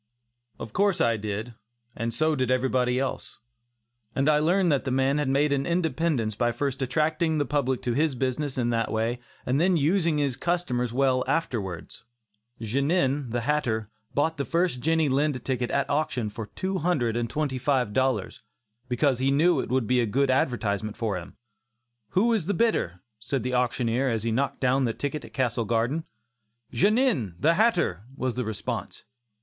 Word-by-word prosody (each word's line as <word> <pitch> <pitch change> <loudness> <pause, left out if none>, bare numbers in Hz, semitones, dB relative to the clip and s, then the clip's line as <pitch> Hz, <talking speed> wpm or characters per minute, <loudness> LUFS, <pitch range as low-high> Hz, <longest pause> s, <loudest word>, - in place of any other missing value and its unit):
Of 110 - -8
course 200 -1 +2
I 115 -1 +3
did, 105 +2 -4 0.4
and 115 +1 -2
so 155 +5 +1
did 130 -2 0
everybody 125 -1 +1
else, 135 0 -3 0.8
and 135 +2 +1
I 150 -1 +5
learned 175 +3 +3
that 140 - +1
the 135 - -2
man 135 +3 +2
had 145 -3 0
made 140 +2 +2
an 135 -1 -1
independence 160 -8 0
by 120 +3 +1
first 140 +1 -3
attracting 155 +4 +1
the 145 - +1
public 130 -2 -1
to 120 - 0
his 150 +1 +1
business 130 +2 -2
in 120 -1 +1
that 115 -1 0
way 115 +2 -1 0.3
and 135 +4 +1
then 180 0 +3
using 165 +1 +2
his 140 -3 0
customers 135 -9 -1
well 130 0 +2
afterwards. 100 - -3 0.6
Genin, 135 - 0
the 120 +1 -1
hatter, 115 -6 -1 0.2
bought 160 +3 +1
the 140 - -1
first 170 -3 0
Jenny 160 +3 +2
Lind 135 -1 0
ticket 125 -2 -1
at 140 -1 0
auction 140 -8 -1
for 110 0 -6
two 190 - -3
hundred 140 -9 0
and 120 -1 -1
twenty 140 -1 -2
five 130 -5 +1
dollars, 130 -2 0 0.5
because 125 +1 +1
he 135 +1 +2
knew 160 +6 +3
it - - -3
would 130 -1 +1
be 125 +2 +2
a 115 - 0
good 130 +5 +2
advertisement 110 -5 0
for 110 -4 -1
him. 90 0 -8 0.8
"Who 230 +5 +4
is 195 -8 0
the 200 - 0
bidder?" 90 - 0 0.2
said 125 +3 -2
the 125 +1 -2
auctioneer, 125 +1 +1
as 115 -3 -1
he 115 - 0
knocked 135 +5 -1
down 130 +1 +2
that 115 - -2
ticket 145 +1 -3
at - - -12
Castle 120 -3 0
Garden. 120 +9 0 0.7
"Genin, 205 - +2
the 165 +3 +4
hatter," 170 - +1
was 130 -1 -1
the 125 - -2
response. 110 -2 -5
130 Hz, 180 wpm, -26 LUFS, 120-155 Hz, 0.8 s, I